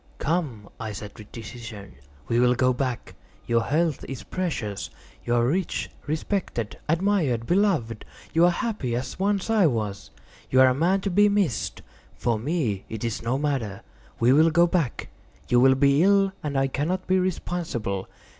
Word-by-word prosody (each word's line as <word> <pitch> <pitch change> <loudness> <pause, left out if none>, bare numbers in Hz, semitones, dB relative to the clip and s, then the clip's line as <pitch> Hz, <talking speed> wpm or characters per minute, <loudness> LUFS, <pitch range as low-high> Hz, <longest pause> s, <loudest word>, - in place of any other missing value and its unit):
"Come," 145 - -2
I 110 -2 -4
said, 105 0 -8
with 105 -1 -13
decision, 115 - -9 0.3
"we 115 - +1
will 125 0 +4
go 130 +1 +3
back; 125 -1 -3 0.3
your 115 0 +2
health 155 +4 0
is 135 -2 -6
precious. 150 - -3 0.3
You 120 - 0
are 120 0 +3
rich, 175 +7 -1 0.2
respected, 155 - -2
admired, 165 - +1
beloved; 170 - +1 0.3
you 165 +2 +5
are - - +6
happy, 175 - -2
as 125 +7 -4
once 200 +2 0
I 210 -6 +5
was. 105 -7 -3 0.4
You 130 - +3
are 130 - +7
a - - +2
man 175 +8 +2
to 195 - -2
be 205 +3 +5
missed. 200 - -1 0.3
For 115 -3 0
me 125 - -1
it 110 0 -6
is 115 -2 -2
no 120 +3 0
matter. 135 -9 -2 0.4
We 120 +2 +5
will 160 +3 +6
go 170 +2 +5
back; 170 -8 -1 0.4
you 120 - +5
will 130 +1 +6
be 140 +2 +4
ill, 195 +1 +4
and 145 -2 -2
I 135 - +3
cannot 160 +8 -2
be 185 0 +2
responsible. 160 - -2
135 Hz, 170 wpm, -25 LUFS, 115-175 Hz, 0.4 s, are